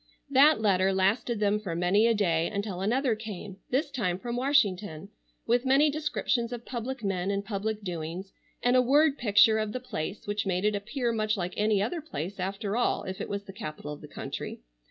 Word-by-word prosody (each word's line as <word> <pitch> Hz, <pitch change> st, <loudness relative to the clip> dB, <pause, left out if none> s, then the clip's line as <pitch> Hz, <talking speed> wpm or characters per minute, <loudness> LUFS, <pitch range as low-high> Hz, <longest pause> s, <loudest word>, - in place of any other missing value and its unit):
That 280 Hz, +2 st, +6 dB
letter 195 Hz, -3 st, +3 dB
lasted 205 Hz, +5 st, +1 dB
them 210 Hz, 0 st, +2 dB
for 190 Hz, -6 st, -4 dB
many 185 Hz, +6 st, +3 dB
a 230 Hz, -, +3 dB
day 170 Hz, -5 st, +2 dB
until 200 Hz, -3 st, -3 dB
another 245 Hz, +5 st, +2 dB
came, 210 Hz, -3 st, -7 dB
this 280 Hz, +4 st, 0 dB
time 195 Hz, -10 st, -1 dB
from 235 Hz, +4 st, -4 dB
Washington, 205 Hz, -, +1 dB, 0.4 s
with 240 Hz, +1 st, +2 dB
many 275 Hz, +3 st, +4 dB
descriptions 280 Hz, -5 st, -1 dB
of 240 Hz, -1 st, -6 dB
public 245 Hz, 0 st, -5 dB
men 190 Hz, -1 st, -1 dB
and 200 Hz, 0 st, -1 dB
public 210 Hz, +1 st, -3 dB
doings, 175 Hz, +1 st, -5 dB, 0.3 s
and 245 Hz, +1 st, +4 dB
a 255 Hz, -, +6 dB
word 285 Hz, +4 st, +4 dB
picture 220 Hz, 0 st, +5 dB
of 215 Hz, -1 st, -2 dB
the 255 Hz, -, -2 dB
place 200 Hz, -6 st, -5 dB
which 205 Hz, -1 st, -2 dB
made 185 Hz, +1 st, 0 dB
it 210 Hz, -, +3 dB
appear 235 Hz, +5 st, -2 dB
much 215 Hz, -1 st, 0 dB
like 180 Hz, -1 st, -3 dB
any 210 Hz, -1 st, +2 dB
other 320 Hz, +10 st, -2 dB
place 200 Hz, -, -6 dB
after 195 Hz, +3 st, -2 dB
all 245 Hz, -, +1 dB
if 190 Hz, 0 st, -5 dB
it -, -, -4 dB
was 200 Hz, 0 st, -3 dB
the 195 Hz, -, -11 dB
capitol 155 Hz, -7 st, -6 dB
of 150 Hz, -, -11 dB
the -, -, -10 dB
country. -, -, -6 dB
210 Hz, 200 wpm, -28 LUFS, 190-245 Hz, 0.4 s, That